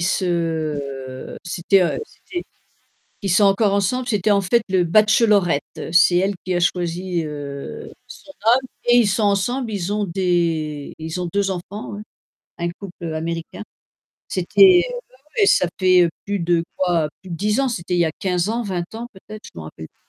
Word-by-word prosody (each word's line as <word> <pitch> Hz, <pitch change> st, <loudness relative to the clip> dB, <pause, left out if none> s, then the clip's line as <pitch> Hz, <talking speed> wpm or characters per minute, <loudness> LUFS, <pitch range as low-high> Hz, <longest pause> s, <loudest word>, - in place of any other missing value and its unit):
se 155 Hz, -7 st, -2 dB
c'était, 180 Hz, +2 st, +2 dB
heu, 175 Hz, -, 0 dB
c'était 350 Hz, -4 st, -8 dB, 0.8 s
qui 200 Hz, -, -3 dB
sont 190 Hz, +4 st, +4 dB
encore 200 Hz, +1 st, +3 dB
ensemble, 240 Hz, +6 st, 0 dB
c'était 210 Hz, -1 st, +1 dB
en 200 Hz, -, +4 dB
fait 215 Hz, +5 st, +2 dB
le 185 Hz, -1 st, +3 dB
bachelorette, 210 Hz, -4 st, +4 dB, 0.3 s
c'est 175 Hz, 0 st, +6 dB
elle 195 Hz, +2 st, +1 dB
qui 185 Hz, -, -1 dB
a 175 Hz, -, +1 dB
choisi, 175 Hz, -1 st, -1 dB
heu, 145 Hz, -2 st, -7 dB, 0.2 s
son 290 Hz, -, -12 dB
homme 255 Hz, +3 st, +4 dB, 0.2 s
et 240 Hz, 0 st, +5 dB
ils 235 Hz, -3 st, +5 dB
sont 215 Hz, +3 st, 0 dB
ensemble, 225 Hz, +5 st, +1 dB
ils 200 Hz, -2 st, -3 dB
ont 210 Hz, 0 st, 0 dB
des 170 Hz, -5 st, -1 dB
ils 160 Hz, +2 st, -5 dB
ont 180 Hz, -, -2 dB
2 200 Hz, -1 st, +1 dB
enfants 200 Hz, +3 st, -6 dB
hein, 210 Hz, -, -7 dB, 0.6 s
un 170 Hz, 0 st, -1 dB
couple, 175 Hz, -1 st, -10 dB
heu, 160 Hz, -, -3 dB
américain. 165 Hz, +5 st, -4 dB, 0.7 s
C'était 370 Hz, -2 st, +5 dB
heu, -, -, -6 dB, 0.2 s
bah -, -, -26 dB, 0.2 s
ouais, 410 Hz, -, +5 dB
ça 180 Hz, -, +4 dB
fait 185 Hz, -2 st, +5 dB, 0.2 s
plus 205 Hz, -2 st, -2 dB
de 170 Hz, 0 st, +1 dB
quoi? 175 Hz, -4 st, +1 dB
Plus 190 Hz, -, -12 dB
de 170 Hz, -, -3 dB
10 210 Hz, +7 st, +1 dB
ans, 270 Hz, -, +1 dB
c'était 180 Hz, -6 st, -3 dB
il 175 Hz, -, +2 dB
y 170 Hz, -, +5 dB
a 160 Hz, -, -1 dB
15 180 Hz, 0 st, 0 dB
ans, 235 Hz, +2 st, -1 dB
20 180 Hz, -4 st, -4 dB
ans 235 Hz, +1 st, -5 dB
peut-être, 210 Hz, +2 st, -12 dB
je -, -, -12 dB
me 80 Hz, -, -6 dB
rappelle 80 Hz, 0 st, -9 dB
p -, -, -31 dB
185 Hz, 190 wpm, -21 LUFS, 170-210 Hz, 0.8 s, c'est